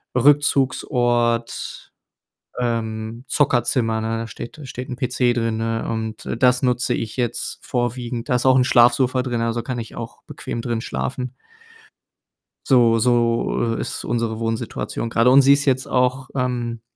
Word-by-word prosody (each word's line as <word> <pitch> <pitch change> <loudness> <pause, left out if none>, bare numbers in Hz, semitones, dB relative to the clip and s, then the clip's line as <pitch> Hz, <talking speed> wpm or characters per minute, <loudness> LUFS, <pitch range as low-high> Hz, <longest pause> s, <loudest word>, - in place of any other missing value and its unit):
Rückzugsort, 125 -4 +1 0.7
ähm, 115 -1 -3
Zockerzimmer, 120 -5 +1
ne? 115 +1 -2
Da 115 0 -4
steht 120 +3 -9
da 150 - -10
steht 130 +1 -7
'n 125 - -4
PC 125 -1 +1
drin, 115 -2 -1
ne, 115 0 -2
und, 110 -1 -4
äh, - - -3
das 125 +2 +3
nutze 125 -1 +1
ich 110 -2 -5
jetzt 120 -2 -2
vorwiegend. 120 -1 -3
Da 130 - +1
ist 125 - 0
auch 130 - +6
'n 130 - +5
Schlafsofa 125 +1 +4
drin, 120 -2 -2
also, 115 0 -1
kann 125 +2 -4
ich 115 - -8
auch - - -8
bequem 115 - -6
drin 115 -2 -2
schlafen. 125 +1 -4 1.3
So 120 -4 +5
so, 115 -1 +1
äh, - - -3
ist - - -4
unsere 115 -1 -2
Wohnsituation 115 0 -3
grade 115 +2 +4
und 135 +2 +7
sie 140 +1 +7
ist 145 +1 +1
jetzt 130 -2 +1
auch, 130 +1 0
ähm, 120 -3 -2
120 Hz, 160 wpm, -21 LUFS, 115-125 Hz, 1.3 s, und